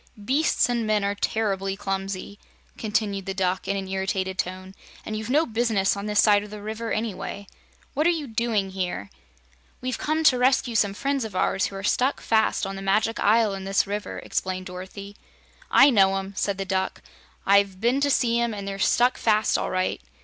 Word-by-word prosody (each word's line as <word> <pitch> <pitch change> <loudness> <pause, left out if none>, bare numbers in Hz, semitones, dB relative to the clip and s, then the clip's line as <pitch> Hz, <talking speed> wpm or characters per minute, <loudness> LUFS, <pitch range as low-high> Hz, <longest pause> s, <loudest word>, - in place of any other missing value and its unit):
"Beasts 275 -1 +2
and 235 -2 -1
men 210 -1 +2
are 200 0 0
terribly 195 -2 -1
clumsy," 195 0 -4 0.4
continued 205 -3 -2
the 195 - -3
Duck 185 -1 -1
in 200 - 0
an 195 -1 -4
irritated 190 0 -2
tone, 185 +1 -4 0.3
"and 215 - -4
you've 215 +1 -5
no 300 +5 +3
business 225 -5 +1
on 200 +1 -5
this 210 -1 +1
side 205 -1 +5
of 210 - -10
the 210 0 -8
River, 220 +2 -5
anyway. 205 -2 -3 0.5
What 305 +4 +2
are - - +5
you 325 -4 -1
doing 220 -5 -1
here?" 180 - -4 0.7
"We've 255 -1 -3
come 315 +1 0
to 255 -5 +5
rescue 255 -1 +2
some 205 -3 +2
friends 275 +2 -1
of 215 -4 -7
ours 190 +1 +1
who 195 - -9
are 195 - -6
stuck 255 +7 +1
fast 220 -2 +1
on 195 0 -5
the 195 - -6
Magic 210 +4 +1
Isle 215 0 +3
in 195 -1 -5
this 195 +1 +1
river," 205 +1 -4
explained 185 0 -3
Dorothy. 190 +2 -8 0.5
"I 275 +1 +7
know 195 -4 +4
'em," 195 +1 -5
said 200 0 -1
the 195 - -3
Duck. 190 0 -2 0.4
"I've 200 -1 +3
been 245 +6 +1
to 285 - +2
see 235 -3 +2
'em, 235 -2 0
and 200 -1 -6
they're 195 0 -4
stuck 245 +5 +3
fast, 215 -1 +2
all - - 0
right. 185 0 -1
205 Hz, 200 wpm, -25 LUFS, 195-230 Hz, 0.7 s, I